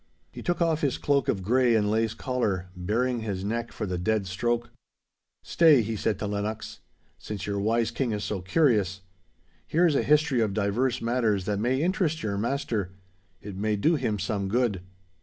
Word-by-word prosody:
He - - -9
took 175 0 0
off 165 -1 +1
his 140 -4 0
cloak 140 -3 +1
of 95 - 0
grey 120 +3 +3
and 105 -2 +2
lace 110 0 0
collar, 105 -10 -2
baring 115 +7 0
his 100 -4 -4
neck 115 +3 -2
for - - -4
the 90 -2 -3
dead 110 +2 0
stroke. 120 +6 -1 0.7
'Stay,' 155 -8 +5
he 110 +1 -3
said 105 -1 -1
to - - -4
Lennox. 105 +2 -4 0.4
'Since 100 +1 -6
your 100 -1 -2
wise 115 +2 +1
King 120 0 -1
is 105 -1 -2
so 100 -3 -3
curious. 100 - +2 0.7
Here 170 +3 +3
is 165 - +3
a - - +2
history 150 -4 +3
of 105 -3 0
divers 115 +4 0
matters 115 -5 +1
that 100 -1 -1
may 130 +6 +1
interest 170 -4 0
your 100 -2 -1
master. 110 -6 -2 0.5
It 100 -2 -7
may 105 +2 0
do 150 +12 +2
him 125 -8 0
some 100 -2 -2
good. 110 -3 0
110 Hz, 185 wpm, -27 LUFS, 100-130 Hz, 0.7 s, Stay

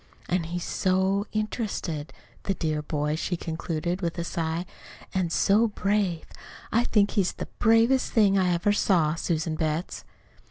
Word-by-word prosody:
"An' 175 -2 +1
he's 175 +1 -4
so 190 +2 +1
interested 210 -8 -3 0.3
the 195 - 0
dear 155 -3 -1
boy!" 150 0 -1
she 175 +2 -2
concluded, 170 +2 -3
with 170 0 -2
a 170 - -1
sigh. 165 +1 -2 0.5
"An' 185 -3 0
so 205 +6 +3
brave! 200 -4 0 0.5
I 235 +2 +2
think 205 -4 +3
he's 195 -4 +1
the - - -5
bravest 225 +4 +4
thing 205 -3 +4
I 185 -2 +3
ever 175 +4 +2
saw, 170 -7 +2
Susan 165 -1 -1
Betts." 155 +2 -2
180 Hz, 150 wpm, -26 LUFS, 165-205 Hz, 0.5 s, bravest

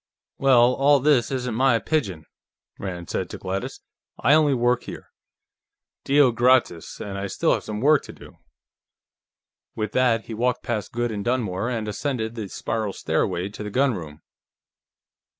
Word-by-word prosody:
"Well, 125 -2 +5
all 140 +2 +4
this 135 -3 +3
isn't 125 -3 -3
my 130 +1 +3
pidgin," 100 - -2 0.5
Rand 90 -3 -6
said - - -2
to - - -7
Gladys. 95 +1 -5 0.4
"I 145 - +4
only 150 -3 +4
work 120 0 +1
here, - - -9 0.9
Deo 140 -2 +4
gratias, 120 -8 +1
and 100 -1 -5
I 100 - -3
still - - +1
have - - -2
some 105 0 -5
work 150 +1 +4
to - - -9
do." - - -15 1.4
With 110 -1 -3
that, 120 -3 +2
he 115 - -7
walked 125 +3 -1
past 110 -5 -3
Goode 120 0 -2
and 105 -2 -4
Dunmore 115 -3 -1
and 115 -3 -3
ascended 110 0 -3
the 110 -3 -5
spiral 110 -1 -3
stairway 90 +2 -1
to 105 - -10
the 105 - -4
gunroom. 95 - -1
120 Hz, 155 wpm, -23 LUFS, 105-130 Hz, 1.4 s, Well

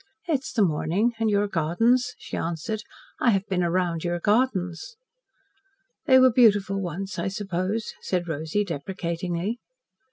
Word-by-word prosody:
"It 310 -5 +2
is 315 +2 -8
the 225 -4 +3
morning 185 +7 +1
and 225 -1 +2
your 205 0 +2
gardens," 225 +9 +1
she - - -7
answered. 170 +6 -3 0.4
"I 245 - +3
have 195 -3 +2
been 185 -2 0
round 175 -1 0
your 175 0 -1
gardens." 205 - 0 1.1
"They 260 -3 +7
were 255 -2 +6
beautiful 205 -5 +4
once, 190 +2 -4
I - - -1
suppose," 195 +1 -2
said 180 -2 -2
Rosy 160 +6 -1
deprecatingly. 175 - -3
195 Hz, 140 wpm, -25 LUFS, 175-225 Hz, 1.1 s, They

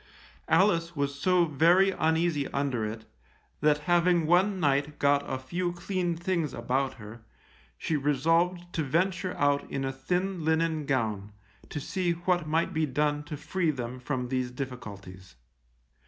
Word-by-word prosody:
Alice 170 -4 +3
was 140 -1 -2
so 180 +1 +4
very 170 +6 +4
uneasy 160 -4 +1
under 135 -5 -1
it, 110 +1 -5 0.5
that 150 0 +3
having 175 -1 +3
one 185 +4 +3
night 145 -1 +1
got 140 0 +3
a - - -1
few 175 +7 -3
clean 175 -1 -2
things 170 -4 -1
about 130 +3 -1
her, 110 +2 -11 0.6
she 160 - -2
resolved 165 +5 +1
to 160 - -1
venture 180 +5 0
out 145 0 +1
in 135 -1 -2
a 135 - -1
thin 180 +5 -2
linen 160 -1 +1
gown, 105 -6 -1 0.4
to 150 - -4
see 180 +3 -1
what 175 -1 0
might 160 +2 0
be 160 -1 +1
done 145 +2 0
to 150 -1 -6
free 180 +2 -1
them 125 -3 -4
from 125 -1 -3
these 130 -1 -1
difficulties. 100 - -8
150 Hz, 150 wpm, -28 LUFS, 135-175 Hz, 0.6 s, so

